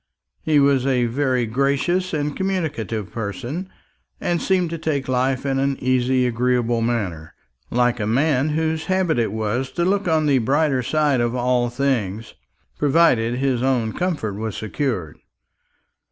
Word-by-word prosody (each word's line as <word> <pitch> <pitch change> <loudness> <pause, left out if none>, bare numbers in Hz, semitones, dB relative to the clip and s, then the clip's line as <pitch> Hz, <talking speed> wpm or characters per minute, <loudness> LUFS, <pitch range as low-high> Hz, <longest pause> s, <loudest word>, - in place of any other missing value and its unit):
He 155 -2 +3
was 140 -2 +3
a 125 -3 +2
very 130 0 0
gracious 140 +10 0
and 150 -2 -2
communicative 145 - -2
person, 120 - -5 0.5
and 175 -1 -1
seemed 180 -3 +1
to 165 - -4
take 150 -4 -2
life 130 +1 0
in 135 -1 0
an 135 0 0
easy 130 0 +2
agreeable 120 -1 +1
manner, 100 -9 -2 0.3
like 120 0 +1
a 105 - -1
man 135 +4 +2
whose 160 +1 -1
habit 185 -7 +1
it 115 -3 0
was 110 +4 -2
to 170 - 0
look 195 +1 +1
on 160 -2 +2
the 140 -3 +3
brighter 135 +2 +1
side 145 -1 +1
of 120 +1 0
all 125 -1 +1
things, 115 -5 -2 0.5
provided 135 -6 +3
his 130 -2 0
own 125 -4 +1
comfort 165 - -2
was 110 +1 -4
secured. 110 - -3
130 Hz, 150 wpm, -21 LUFS, 120-150 Hz, 0.5 s, He